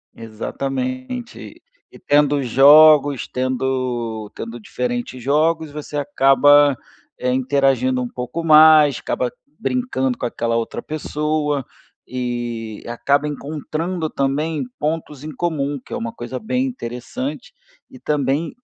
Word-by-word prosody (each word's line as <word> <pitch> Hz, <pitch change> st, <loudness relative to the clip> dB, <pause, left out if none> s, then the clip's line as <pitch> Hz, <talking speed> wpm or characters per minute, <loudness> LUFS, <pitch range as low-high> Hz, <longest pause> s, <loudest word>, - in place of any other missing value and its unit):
Exatamente. 130 Hz, -, -5 dB, 0.3 s
E -, -, -15 dB
tendo 145 Hz, 0 st, +2 dB
jogos, 145 Hz, +2 st, +6 dB
tendo 125 Hz, -4 st, -2 dB
tendo 115 Hz, +1 st, -7 dB
diferentes 120 Hz, +2 st, -4 dB
jogos, 155 Hz, +4 st, +1 dB
você 150 Hz, 0 st, -6 dB
acaba, 145 Hz, 0 st, +4 dB, 0.4 s
eh, 125 Hz, -, -1 dB
interagindo 130 Hz, -1 st, +1 dB
um 125 Hz, -, -2 dB
pouco 125 Hz, +7 st, -5 dB
mais, 155 Hz, -3 st, +7 dB
acaba 125 Hz, -1 st, -2 dB, 0.3 s
brincando 225 Hz, -, -1 dB
com -, -, -3 dB
aquela 115 Hz, -1 st, -2 dB
outra 115 Hz, -1 st, -3 dB
pessoa, 150 Hz, -2 st, -2 dB, 0.4 s
e 120 Hz, -3 st, -4 dB
acaba 140 Hz, +5 st, 0 dB
encontrando, 155 Hz, +3 st, -4 dB
também, 150 Hz, +4 st, -1 dB, 0.2 s
pontos 150 Hz, -2 st, -3 dB
em 155 Hz, -, -6 dB
comum, 145 Hz, -3 st, -2 dB
que -, -, -10 dB
é -, -, -2 dB
uma 230 Hz, -1 st, -4 dB
coisa -, -, -6 dB
bem 255 Hz, +4 st, -1 dB
interessante. 130 Hz, -, -6 dB, 0.4 s
E 130 Hz, -, -14 dB
também, 145 Hz, +3 st, -1 dB
140 Hz, 115 wpm, -20 LUFS, 125-155 Hz, 0.4 s, mais